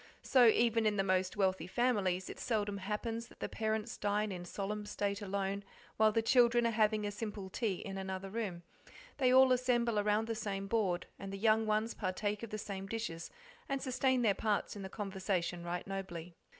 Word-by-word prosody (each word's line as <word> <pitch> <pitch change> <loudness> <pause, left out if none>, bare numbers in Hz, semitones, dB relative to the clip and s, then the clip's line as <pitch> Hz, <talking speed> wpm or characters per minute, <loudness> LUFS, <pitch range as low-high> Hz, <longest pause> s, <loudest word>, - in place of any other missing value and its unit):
So 250 -3 +6
even 225 0 +4
in 210 -1 +1
the 195 - +3
most 185 0 +1
wealthy 190 -4 +1
families 190 -5 +1
it - - -8
seldom 205 -4 -1
happens 225 +4 -3
that - - -19
the - - -2
parents 220 +1 -2
dine 205 +1 0
in 180 -1 -6
solemn 205 +3 -4
state 205 0 -2
alone, 200 0 -2 0.3
while 220 0 +5
the 225 +1 +1
children 240 0 +5
are 230 - +3
having 215 -1 +2
a 205 - -1
simple 205 -2 -5
tea 215 -4 0
in 195 +2 -6
another 190 0 -5
room: 195 -6 -3 0.5
they 255 -3 +3
all 260 0 +7
assemble 240 -3 +2
around 210 +1 +2
the 230 - -1
same 200 -3 -3
board, 195 -5 0
and 195 0 -6
the 195 - -4
young 220 +1 +3
ones 215 +2 +1
partake 205 +1 -2
of 230 - -6
the 215 - -4
same 195 -2 -5
dishes, 195 -7 -4 0.4
and 275 0 0
sustain 260 -1 +1
their 210 -3 +4
parts 210 +1 -1
in 205 - -6
the 190 - -6
conversation 190 -4 -2
right 175 0 -3
nobly. 180 -3 -6
210 Hz, 195 wpm, -34 LUFS, 195-225 Hz, 0.5 s, all